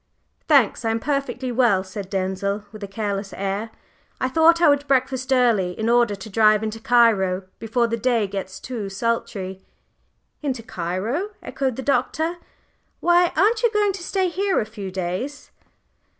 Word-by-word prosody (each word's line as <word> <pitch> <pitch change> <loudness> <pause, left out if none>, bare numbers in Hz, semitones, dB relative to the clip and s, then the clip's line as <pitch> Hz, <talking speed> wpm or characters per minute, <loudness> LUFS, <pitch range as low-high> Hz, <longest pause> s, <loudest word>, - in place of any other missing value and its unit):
"Thanks, 275 -8 +4
I 225 - 0
am 225 0 0
perfectly 265 -1 -2
well," 230 -6 +3
said 190 0 -7
Denzil, 195 +1 -2
with 215 -1 -10
a - - -4
careless 200 -1 -3
air. 200 +3 -3 0.5
"I 255 - 0
thought 325 +4 +5
I 340 - +5
would 285 0 +3
breakfast 260 -1 0
early 230 -8 +3
in 220 +1 -1
order 235 -3 +3
to 195 +3 -10
drive 215 0 +4
into 220 0 -4
Cairo 215 -6 +3 0.2
before 230 +2 0
the 230 0 -1
day 235 -2 +1
gets 190 -1 -6
too 225 -6 -5
sultry." 195 -3 -3 0.8
"Into 265 -6 -3
Cairo!" 220 - -3
echoed 265 -3 -2
the 265 - -5
Doctor. 320 +5 0 0.6
"Why, 350 0 +4
aren't 440 +4 +3
you 475 - +4
going 415 -2 +1
to 375 - -7
stay 375 +1 0
here 385 +2 0
a - - -1
few 210 -3 -7
days?" 190 +11 -4
230 Hz, 165 wpm, -22 LUFS, 200-275 Hz, 0.8 s, thought